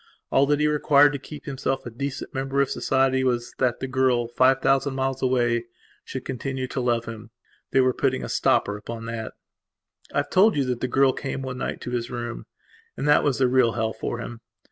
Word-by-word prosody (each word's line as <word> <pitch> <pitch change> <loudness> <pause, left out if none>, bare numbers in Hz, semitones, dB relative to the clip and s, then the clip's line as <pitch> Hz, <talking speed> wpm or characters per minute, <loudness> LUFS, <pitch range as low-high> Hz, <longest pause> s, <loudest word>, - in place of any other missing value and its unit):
All 140 +1 +4
that 145 0 +2
he 150 - +2
required 145 -1 +4
to 140 - -3
keep 150 +2 -10
himself 135 -1 -2
a 120 - -6
decent 140 +4 -5
member 135 +1 -1
of 140 -1 +2
society 130 0 +1
was, 120 -1 -1
that 125 -3 +1
the 130 - -2
girl, 130 -2 +1
five 130 +2 +3
thousand 135 +1 +2
miles 135 0 -1
away, 120 -2 +1 0.4
should 130 - -7
continue 130 0 -3
to 135 - -2
love 120 -1 0
him. 115 0 -8 0.4
They 135 - +4
were 130 0 +3
putting 65 - 0
a - - -4
stopper 100 +10 +1
upon 115 +2 -7
that. 115 -1 -5 0.8
I - - -3
have - - -25
told 205 +3 +5
you 140 - +2
that 125 -2 -2
the 130 - 0
girl 135 0 +3
came 135 -1 -4
one 130 -1 -5
night - - -4
to 125 - -5
his 120 -1 -2
room. 120 -1 -5 0.5
And - - -2
that 150 - +5
was 140 -4 +1
the 130 - +3
real 125 -2 +3
hell 110 -1 -1
for 110 - -4
him. 120 0 -7
130 Hz, 215 wpm, -24 LUFS, 120-135 Hz, 0.8 s, told